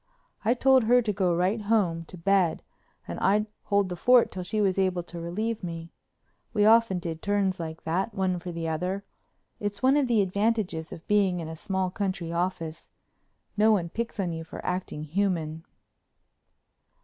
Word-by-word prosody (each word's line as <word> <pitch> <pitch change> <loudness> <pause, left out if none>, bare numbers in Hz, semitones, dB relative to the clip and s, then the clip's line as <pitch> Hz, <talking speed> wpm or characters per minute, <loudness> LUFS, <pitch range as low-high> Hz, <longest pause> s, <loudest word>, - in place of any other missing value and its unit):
I 230 +3 +3
told 260 -1 +4
her 245 +2 +5
to 210 -2 -1
go 185 -3 +1
right 185 +6 +1
home 195 -6 +1
to 180 - -11
bed 185 -1 +2 0.4
and 85 - -5
I'd 205 +3 +3 0.2
hold 200 -1 +2
the 180 - -4
fort 245 +5 +5
till 185 - -5
she 215 +4 -2
was 195 -2 +2
able 185 -2 +1
to 175 0 -8
relieve 210 +6 -3
me. 165 -1 -6 0.6
We 210 -1 +4
often 225 -3 +5
did 165 -2 -5
turns 200 -2 0
like 160 -1 -6
that, 180 +7 -1
one 185 -2 0
for 175 +1 -6
the 165 -1 -4
other. 180 +5 -2 0.5
It's 205 +1 -4
one 265 +2 +5
of 280 -3 +2
the 225 -4 +3
advantages 200 -4 -1
of 165 - -9
being 195 -4 +2
in 165 - -5
a 160 - -6
small 190 +2 -2
country 185 -4 -3
office—no 175 +4 -3
one 180 -6 +1
picks 230 +3 -4
on 180 -3 -1
you 165 0 -5
for 160 - -9
acting 180 -4 -3
human. 160 -2 -1
185 Hz, 175 wpm, -27 LUFS, 170-210 Hz, 0.6 s, her